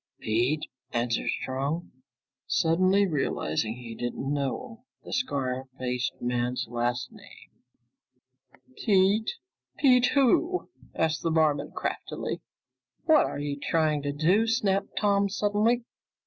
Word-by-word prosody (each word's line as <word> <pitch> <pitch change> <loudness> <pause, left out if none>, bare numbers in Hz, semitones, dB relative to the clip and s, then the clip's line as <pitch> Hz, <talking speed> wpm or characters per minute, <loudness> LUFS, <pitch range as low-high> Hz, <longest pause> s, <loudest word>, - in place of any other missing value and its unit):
"Pete," 120 +8 0 0.3
answered 120 0 0
Strong, 140 +6 -2 0.6
suddenly 185 +5 +3
realizing 115 - -1
he 120 -2 -8
didn't 120 +4 -3
know 220 - -3 0.2
the - - -8
scar 135 - -1
faced 125 0 -2
man's 125 0 -1
last 120 - -2
name. 200 -3 -16 1.3
"Pete? 205 +1 +3 0.5
Pete 250 -3 +5
who?" 330 +7 +2 0.2
asked 160 -1 0
the 165 - 0
barman 160 -2 +2
craftily. - - -4 0.6
"What 315 -2 +5
are - - -5
you 145 0 -3
trying 155 -1 +1
to 145 0 -2
do?" 175 +10 +2
snapped 200 -3 0
Tom 200 -1 +2
suddenly. 210 +4 +1
160 Hz, 110 wpm, -27 LUFS, 125-205 Hz, 1.3 s, Pete